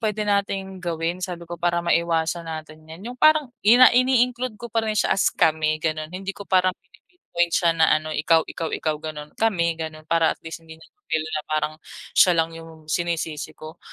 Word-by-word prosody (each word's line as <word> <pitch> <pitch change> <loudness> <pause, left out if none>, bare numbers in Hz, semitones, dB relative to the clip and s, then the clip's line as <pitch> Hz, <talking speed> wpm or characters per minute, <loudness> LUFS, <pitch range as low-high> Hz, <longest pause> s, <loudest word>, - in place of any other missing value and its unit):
puwede 215 -2 -1
nating 195 -2 -1
gawin?" 170 +1 -3
Sabi 175 -2 -5
ko. 175 - -6
"Para 175 0 +1
maiwasan 170 0 0
natin 155 0 -8
'yan," 165 +5 -11
'yung 245 - -6
parang 310 -2 +5 0.2
ina 245 +4 +8
ini-include 250 -2 +2
ko 240 - -7
pa 225 - +1
rin 215 -1 -2
siya - - +2
as 195 - +3
kami 155 -1 +1
ganon. 155 -1 -3
Hindi 190 +2 -5
ko 200 - -9
parang 185 -1 +2
pini-pin-point 175 - -4
siya 170 - +3
na 160 -1 +5
ano, 155 0 -2
ikaw, 160 +2 +3
ikaw, 165 - -5
ikaw, 155 -1 -2
gano'n, 150 -1 -8
kami 170 -7 +1
gano'n. 155 -1 -6
Para 165 0 +2
at - - -33
least 165 +1 -7
hindi 160 - -11
niya - - -17
ma-feel 160 -1 -2
na 155 -1 -2
parang 155 0 -1 0.4
siya 180 - +6
lang 165 0 +1
yung 160 -1 -12
sinisisi 165 -3 -2
ko. 155 +2 -11
170 Hz, 200 wpm, -23 LUFS, 160-195 Hz, 0.4 s, ina